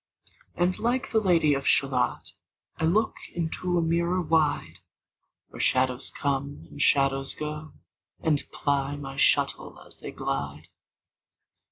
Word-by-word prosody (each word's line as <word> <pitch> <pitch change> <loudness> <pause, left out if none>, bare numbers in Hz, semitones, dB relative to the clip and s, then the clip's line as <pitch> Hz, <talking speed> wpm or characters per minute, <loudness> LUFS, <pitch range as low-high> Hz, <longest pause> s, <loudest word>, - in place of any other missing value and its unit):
And 175 +2 +1
like 245 +2 0
the 220 - +4
Lady 170 -7 +3
of 135 -1 -2
Shalott 135 -2 +1 0.5
I 160 - 0
look 215 +7 +2 0.2
into 175 +1 -1
a 170 - +2
mirror 170 +2 +1
wide, 160 -3 +1 0.7
Where - - -7
shadows 130 0 +1
come, 140 0 -3
and 145 - -7
shadows 135 -1 +3
go, 150 0 -5 0.5
And 155 -3 +1
ply 140 0 0
my 135 -1 -7
shuttle - - +1
as - - -12
they - - -7
glide. 70 +4 -4
150 Hz, 130 wpm, -27 LUFS, 135-170 Hz, 0.7 s, the